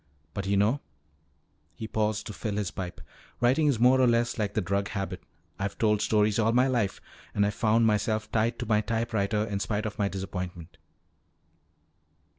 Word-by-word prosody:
But 100 -1 -4
you 100 0 +2
know," 110 +8 +3 1.0
he 110 - -6
paused 105 -1 -1
to 105 - -6
fill 105 0 -4
his 105 -3 -2
pipe, 90 -2 -6 0.4
"writing 130 +6 +3
is 135 -6 +2
more 130 +2 +5
or 130 - +5
less 120 0 +1
like 105 -1 -1
the - - +2
drug 100 +2 -1
habit. 95 -4 -4 0.4
I've 100 0 -3
told 105 -2 +2
stories 105 0 +2
all 110 +1 +3
my 125 +2 +4
life, 120 -7 0 0.4
and 100 - +3
I 100 - +1
found 110 +2 +2
myself 110 0 0
tied 115 +2 +1
to 120 - -4
my 105 -1 +2
typewriter 110 -2 0
in 100 -2 -3
spite 105 +1 -2
of 110 +1 -5
my 100 - +2
disappointment. 90 -4 -6
105 Hz, 180 wpm, -28 LUFS, 100-115 Hz, 1.0 s, more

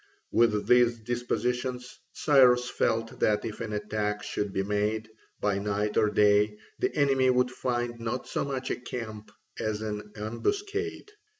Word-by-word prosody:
With 110 -3 +3
these 120 -1 +5
dispositions 125 +2 -2 0.2
Cyrus 125 -4 +5
felt 115 0 -1
that 105 0 +2
if 110 0 -5
an 115 -2 -4
attack 105 0 -2
should 105 -1 -3
be 95 0 -1
made, 105 +2 -1 0.3
by 100 -1 +1
night 105 +1 -1
or 105 - +4
day, 105 0 +3 0.2
the - - +1
enemy 135 -3 +3
would 125 0 +3
find 120 -2 -2
not 115 +2 -3
so - - -1
much 135 -2 -3
a - - -1
camp 110 -4 -7 0.3
as 110 0 -2
an 105 -1 -5
ambuscade. 405 - -3
115 Hz, 145 wpm, -28 LUFS, 105-125 Hz, 0.3 s, these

